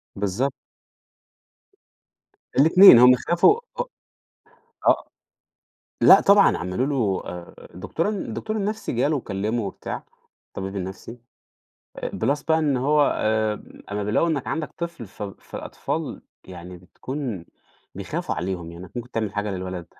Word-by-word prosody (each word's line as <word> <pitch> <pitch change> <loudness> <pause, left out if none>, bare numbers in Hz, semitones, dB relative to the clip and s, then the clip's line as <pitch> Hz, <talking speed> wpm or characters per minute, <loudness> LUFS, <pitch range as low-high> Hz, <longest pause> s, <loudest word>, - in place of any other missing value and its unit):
بالضبط. 105 +8 -1 2.1
الاتنين، 165 -1 +9
هم 125 +1 +8
خافوا 175 - +3 0.2
أ - - +2 1.0
آه، - - +4 1.0
لأ - - +8
طبعًا 200 0 +5
عملوا 90 +9 -2
له 115 -10 0
آآ 90 -1 -9 0.2
الدكتور 100 - -2
ال 210 -2 -3
الدكتور 215 0 -4
النفسي 215 +2 -2
جاله 145 +5 +1
وكلمه 110 0 -2
وبتاع 100 - -6 0.4
الطبيب 95 +1 -6
النفسي 95 +5 -7 0.9
plus 145 +1 -1
بقى 160 - +4
إن 150 -4 +1
هو 145 +4 +3
آآ، 110 -1 0 0.3
أما 105 0 -2
بيلاقوا 110 +11 +1
إنك 145 -5 -2
عندك 155 -2 -3
طفل 170 -8 -5
ف 100 - -11
فالأطفال 100 -1 -6 0.2
يعني 90 0 -10
بتكون 115 - -6 0.5
بيخافوا - - -4
عليهم 90 -1 -4
لأنك 85 +2 -10
ممكن 120 0 -6
تعمل 110 -4 -3
حاجة 105 0 -2
للولد 90 -2 -5
115 Hz, 125 wpm, -23 LUFS, 95-150 Hz, 2.1 s, الاتنين